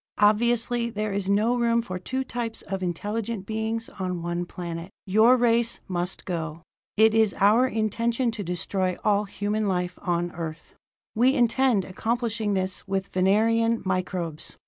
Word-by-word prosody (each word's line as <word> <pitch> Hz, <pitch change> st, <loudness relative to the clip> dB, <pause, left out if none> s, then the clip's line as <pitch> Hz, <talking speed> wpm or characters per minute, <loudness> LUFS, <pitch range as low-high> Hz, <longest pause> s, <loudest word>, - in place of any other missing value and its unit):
Obviously, 235 Hz, +2 st, +2 dB
there 210 Hz, -2 st, -3 dB
is 195 Hz, -1 st, -2 dB
no 215 Hz, +5 st, +3 dB
room 235 Hz, -1 st, +2 dB
for 185 Hz, -4 st, -5 dB
two 260 Hz, +8 st, -3 dB
types 235 Hz, -3 st, -4 dB
of 195 Hz, -1 st, -4 dB
intelligent 205 Hz, +4 st, -3 dB
beings 220 Hz, +1 st, -2 dB
on 180 Hz, -2 st, -3 dB
one 175 Hz, +1 st, -2 dB
planet 170 Hz, -1 st, -6 dB, 0.2 s
your 220 Hz, +6 st, +5 dB
race 235 Hz, -1 st, +2 dB
must 180 Hz, 0 st, -3 dB
go! 165 Hz, -2 st, -4 dB, 0.3 s
It 220 Hz, 0 st, +6 dB
is 220 Hz, -3 st, +3 dB
our 220 Hz, +6 st, +5 dB
intention 230 Hz, +2 st, 0 dB
to 220 Hz, -2 st, -5 dB
destroy 185 Hz, +1 st, -2 dB
all 210 Hz, 0 st, +2 dB
human 205 Hz, +1 st, -2 dB
life 180 Hz, -1 st, -1 dB
on 175 Hz, -2 st, -1 dB
Earth! 165 Hz, -2 st, -7 dB, 0.4 s
"We 250 Hz, +5 st, +3 dB
intend 240 Hz, -4 st, +3 dB
accomplishing 225 Hz, +1 st, -1 dB
this 185 Hz, +1 st, -2 dB
with 195 Hz, 0 st, -2 dB
Venerian 225 Hz, +5 st, +2 dB
microbes. 185 Hz, -4 st, -3 dB
210 Hz, 145 wpm, -25 LUFS, 185-230 Hz, 0.4 s, It